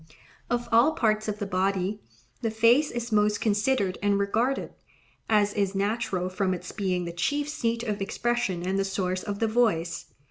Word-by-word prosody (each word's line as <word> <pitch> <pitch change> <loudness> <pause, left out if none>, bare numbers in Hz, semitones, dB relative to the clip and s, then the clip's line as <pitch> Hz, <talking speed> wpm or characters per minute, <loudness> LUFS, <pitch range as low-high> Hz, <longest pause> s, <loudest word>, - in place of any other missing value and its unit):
Of 240 0 -1
all 235 +7 +5
parts 215 -4 +1
of 210 -1 -2
the 205 - -3
body, 195 +2 -1 0.4
the 230 - 0
face 230 +7 +4
is 240 0 -4
most 210 -1 +2
considered 210 -2 +1
and 205 0 +2
regarded, 225 +7 0 0.6
as 205 -2 +3
is 200 -1 0
natural 200 -2 -1
from 185 0 0
its 175 - -8
being 185 -3 -1
the 170 - -5
chief 285 +13 -1
seat 230 -5 -1
of 210 -4 -3
expression 200 -3 -1
and 190 +1 0
the - - +2
source 185 -1 -2
of 205 -2 -4
the 225 - +1
voice. 210 -8 +1
210 Hz, 175 wpm, -27 LUFS, 195-230 Hz, 0.6 s, all